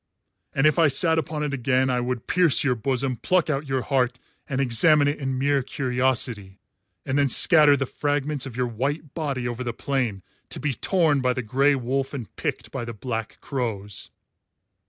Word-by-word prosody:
And 135 Hz, -, +2 dB
if 155 Hz, +2 st, +4 dB
I 165 Hz, -, +6 dB
sat 160 Hz, +3 st, +3 dB
upon 155 Hz, -1 st, -4 dB
it 145 Hz, -1 st, -2 dB
again 130 Hz, 0 st, +1 dB
I 125 Hz, -, +1 dB
would 125 Hz, -1 st, -3 dB
pierce 175 Hz, -4 st, +3 dB
your 135 Hz, -3 st, +2 dB
bosom, 130 Hz, +1 st, -1 dB
pluck 180 Hz, +1 st, +1 dB
out 140 Hz, +1 st, -3 dB
your 135 Hz, -2 st, -1 dB
heart 125 Hz, -2 st, 0 dB, 0.3 s
and 130 Hz, -, -2 dB
examine 145 Hz, +4 st, +4 dB
it 145 Hz, -, -1 dB
in 135 Hz, -2 st, -2 dB
mere 140 Hz, +1 st, +1 dB
curiosity, 125 Hz, -7 st, -1 dB, 0.5 s
and 135 Hz, +2 st, 0 dB
then 140 Hz, -1 st, +2 dB
scatter 150 Hz, +2 st, +5 dB
the 140 Hz, -, -1 dB
fragments 145 Hz, 0 st, -2 dB
of 125 Hz, -2 st, -9 dB
your 125 Hz, -, +1 dB
white 135 Hz, +6 st, -3 dB
body 140 Hz, -6 st, -3 dB
over 120 Hz, +1 st, -4 dB
the 120 Hz, -2 st, -3 dB
plain, 120 Hz, -7 st, -2 dB, 0.3 s
to -, -, -6 dB
be 150 Hz, -2 st, -1 dB
torn 155 Hz, -, +1 dB
by 125 Hz, 0 st, +1 dB
the 130 Hz, -, -4 dB
grey 135 Hz, +6 st, +2 dB
wolf 135 Hz, +2 st, -2 dB
and 120 Hz, -6 st, -8 dB
picked -, -, -4 dB
by -, -, -4 dB
the 115 Hz, 0 st, -6 dB
black 115 Hz, 0 st, -5 dB
crows." 110 Hz, -7 st, -4 dB
135 Hz, 190 wpm, -24 LUFS, 125-145 Hz, 0.5 s, I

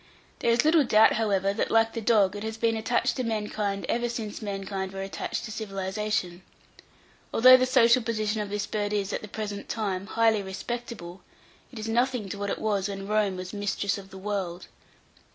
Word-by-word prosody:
There -, -, +1 dB
is 235 Hz, +4 st, +3 dB
little 315 Hz, -1 st, +5 dB
doubt, 220 Hz, -3 st, +5 dB
however, 200 Hz, -3 st, +1 dB
that, 210 Hz, -, -1 dB
like 225 Hz, 0 st, +3 dB
the 230 Hz, -, -3 dB
dog, 210 Hz, -3 st, +3 dB
it 205 Hz, -, -5 dB
has 220 Hz, +1 st, -4 dB
been 225 Hz, 0 st, +1 dB
attached 240 Hz, +2 st, 0 dB
to 255 Hz, -, -1 dB
mankind 210 Hz, -3 st, -2 dB
ever 240 Hz, 0 st, 0 dB
since 225 Hz, -3 st, -5 dB
mankind 195 Hz, -2 st, -4 dB
were 195 Hz, 0 st, -4 dB
attached 195 Hz, -, -4 dB
to 215 Hz, -, -7 dB
civilization. 195 Hz, -2 st, -3 dB, 0.9 s
Although 255 Hz, +2 st, +8 dB
the 255 Hz, 0 st, +1 dB
social 255 Hz, -1 st, +5 dB
position 215 Hz, -2 st, -1 dB
of 205 Hz, -, -4 dB
this 205 Hz, 0 st, -2 dB
bird 205 Hz, 0 st, -2 dB
is, 205 Hz, -1 st, -1 dB
at -, -, -2 dB
the 210 Hz, -, -8 dB
present 205 Hz, -1 st, -6 dB
time, 200 Hz, -4 st, -2 dB
highly 225 Hz, 0 st, +2 dB
respectable, 195 Hz, -2 st, -6 dB, 0.5 s
it 250 Hz, -, -11 dB
is 220 Hz, 0 st, -5 dB
nothing 240 Hz, -2 st, 0 dB
to 200 Hz, -, -5 dB
what 200 Hz, 0 st, -2 dB
it -, -, -1 dB
was 205 Hz, -2 st, -1 dB
when 195 Hz, -1 st, -5 dB
Rome 210 Hz, -2 st, +1 dB
was 185 Hz, +1 st, -7 dB
mistress 205 Hz, 0 st, -1 dB
of 195 Hz, -1 st, -12 dB
the 190 Hz, -, -11 dB
world. 190 Hz, -3 st, -3 dB
210 Hz, 195 wpm, -27 LUFS, 195-225 Hz, 0.9 s, Although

